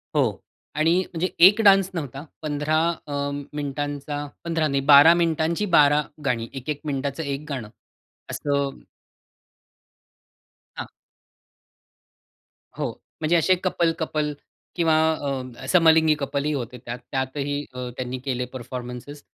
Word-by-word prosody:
हो. - - +1 0.3
आणि 160 +3 +3 0.2
म्हणजे 175 +2 -1 0.2
एक 210 +3 +3
डान्स 195 -2 +6
नव्हता. 145 -4 -5 0.2
15 150 0 0 0.3
अ, 145 - -5 0.4
मिनिटांचा 145 0 -4 0.2
15 165 -2 0
नाही, 140 -1 0
12 145 +4 +9
मिनिटांची 170 +2 +1
12 145 +1 +5 0.2
गाणी. 115 -3 0
1-1 140 +2 -5
मिनिटाचं 140 +2 -2
एक 140 +1 -4
गाणं 125 -7 -4 0.6
असं 140 -1 -1 2.0
हां. - - -5 1.9
हो, - - -2 0.3
म्हणजे 160 +2 +2
असे 185 +3 +4
कपल-कपल 160 -4 0 0.4
किंवा 165 -3 +3 0.2
अ, 130 -4 -5
समलिंगी 160 -3 +5
कपलही 140 +1 -1
होते 125 -2 -4
त्यात. 120 +1 -5
त्यातही 140 +2 -2
अ, 125 -1 -5
त्यांनी 130 0 -4
केले 125 -2 -1
परफॉर्मन्सेस 125 +3 -7
145 Hz, 110 wpm, -24 LUFS, 135-160 Hz, 2.0 s, 12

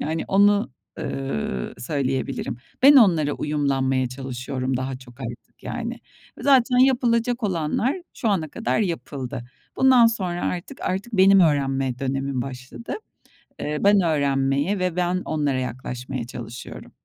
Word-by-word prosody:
Yani, 160 +2 -2
onu, 205 -1 +4 0.3
ııı, 135 - -3
söyleyebilirim. 135 -3 -2 0.3
Ben 280 +2 +9
onlara 165 - +5
uyumlanmaya 135 -4 0
çalışıyorum 130 0 -3
daha 130 0 -3
çok 130 0 -16
artık 120 -1 -9
yani. - - -5 0.4
Zaten 260 -2 +4
yapılacak 245 -2 +3
olanlar 190 - 0 0.2
şu 230 - -1
ana 180 -7 0
kadar 230 +8 -1
yapıldı. 140 - -4 0.3
Bundan 255 -3 +6
sonra 185 -6 -1
artık 180 +9 -4
artık 195 +6 -3
benim 195 0 +6
öğrenme 135 -5 +1
dönemim 135 -1 -2
başladı. 130 - -7 0.7
Eee, 150 0 -2
ben 200 0 +5
öğrenmeye 140 +2 +1
ve 180 -2 -1
ben 180 0 0
onlara 145 -4 0
yaklaşmaya 125 0 -5
çalışıyorum. 120 0 -9
150 Hz, 125 wpm, -23 LUFS, 130-195 Hz, 0.7 s, Ben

